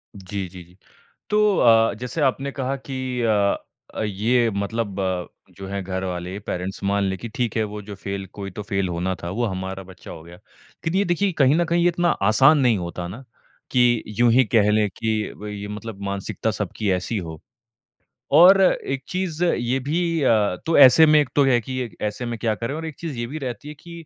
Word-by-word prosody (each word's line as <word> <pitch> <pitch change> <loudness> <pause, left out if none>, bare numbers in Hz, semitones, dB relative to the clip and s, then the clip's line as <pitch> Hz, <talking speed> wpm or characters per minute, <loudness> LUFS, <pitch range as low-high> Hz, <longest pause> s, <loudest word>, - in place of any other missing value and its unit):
जी, 95 0 -5
जी, 90 0 -11
जी। 90 +2 -22 0.5
तो 210 -2 +3
अ, 115 -1 +5
जैसे 125 +7 -4
आपने 135 0 0
कहा 135 0 -2
कि 135 -1 -4 0.2
अ 105 -3 +2 0.4
अ, - - -3
ये 115 +4 +1
मतलब 100 0 -3
अ, 95 -2 -1 0.3
जो 95 - -7
है 100 0 -3
घरवाले 95 0 -4
पेरेंट्स 90 +2 -4
मान 100 +1 +1
लें 95 -1 -1
कि 115 - -7
ठीक 120 -4 -2
है 110 - +2
वो 105 - -6
जो 105 0 -8
फेल 100 0 -5
कोई 100 -1 -7
तो 105 +3 -7
फेल 95 -2 -1
होना 90 +2 -2
था 85 - -4
वो 120 +5 -1
हमारा 95 -1 -4
बच्चा 90 - -12
हो 80 - -9
गया। 85 +2 -13
लेकिन 160 - -9
ये 200 - +2
देखिए 185 +2 0
कहीं 135 +1 +5
न 175 - +2
कहीं 170 +1 +1
ये 175 - +4
इतना 175 0 +1 0.2
आसान 135 +7 +5
नहीं 125 -6 +3
होता 85 0 -5
ना 115 +9 -9 0.5
कि 120 -3 +3 0.2
यूँ 120 -1 +5
ही 130 +2 +5
कह 105 -1 +3
ले 105 0 +2
कि 110 +3 -3 0.2
वही 105 -1 -7
मतलब 105 -1 -7
मानसिकता 100 +2 -2
सबकी 105 0 -3
ऐसी 95 +4 -2
हो। 80 -3 -7 1.0
और 185 +5 +8
एक 135 -7 +1
चीज़ 180 -2 -2
ये 125 -5 0
भी 150 +7 -1 0.2
अ, 105 -7 +3
तो 165 - +2
ऐसे 145 +3 +8
में 150 0 +5
एक 145 -3 0
तो 145 - +5
है 125 -3 +4
कि 130 0 -4
ऐसे 105 +4 -3
में 120 -1 -4
क्या 110 -1 0
करे? 115 +5 -4
और 160 +2 -5
एक 160 -3 -6
चीज़ 160 -6 -5
ये 120 0 -3
भी 150 +6 -6
रहती 130 -2 -6
है 150 - -7
कि 170 -1 -10
110 Hz, 210 wpm, -22 LUFS, 100-135 Hz, 1.0 s, और